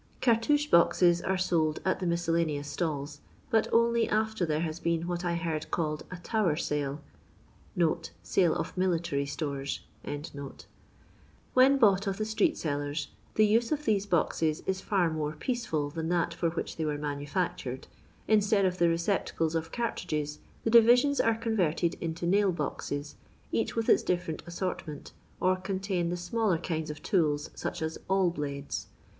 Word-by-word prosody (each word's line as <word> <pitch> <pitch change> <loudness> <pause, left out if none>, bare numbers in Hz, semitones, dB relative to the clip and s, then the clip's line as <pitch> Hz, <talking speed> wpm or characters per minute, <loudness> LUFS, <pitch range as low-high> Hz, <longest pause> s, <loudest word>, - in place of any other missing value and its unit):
VarUmeke 265 +6 +3
boxet 175 0 +5
are 190 - +2
sold 165 -4 +1
at 185 - +1
the 185 - -2
miscellaneous 165 -4 0
stalls, 145 -3 -3 0.3
but 220 -1 +3
only 235 0 +3
after 220 -4 0
there 155 0 0
has 160 -1 -3
been 170 -1 0
what 175 0 -2
I 175 -1 0
heaid 160 -2 -3
called 155 -2 -2
a 180 - -6
" 175 - -18
Tower 210 -9 +2
sale 145 -2 -2 0.6
" 170 -3 -2
(sale 175 -4 +2
of - - -3
military 170 -6 0
stores). 140 -2 -3 1.7
When 265 +2 +6
bought 200 -5 +4
of 195 -1 -1
the 215 - -1
street 220 -1 +1
sellers, 145 -1 -2 0.3
the 215 - +5
use 230 +2 +2
of 300 -1 -1
these 205 -2 +1
boxes 160 -3 +1
is 190 0 -1
ba 195 -4 +2
more 155 -2 -2
peaceful 155 - -2
than 160 +1 -3
that 170 -1 +1
for 170 0 0
which 165 - -4
they 160 - -1
were 150 -1 -1
manu&ctured. 145 -1 -3 0.4
Instead 210 -2 +3
of 185 0 0
the 170 - +5
recep 170 +3 +1
tacles 165 -1 -1
of 165 0 -2
cartridges, 155 -10 -2 0.2
the 225 - 0
divisions 245 +5 +6
are 230 0 +2
conTerted 180 -7 +1
into 165 0 -3
nail 195 +2 +3
boxes, 145 -2 -4 0.3
each 225 - -1
with 225 -1 -1
iu - - +7
different 175 -3 -2
assortment, 175 -3 -4 0.3
or 185 0 +3
contain 190 -2 -2
the 175 - -2
smaller 185 +1 0
kinds 160 -2 -3
of 150 -1 -7
tools, 150 -7 +1
such 175 - -4
as 160 0 -3
awl 190 -2 +3
blades. 140 -3 -4
175 Hz, 160 wpm, -29 LUFS, 155-200 Hz, 1.7 s, iu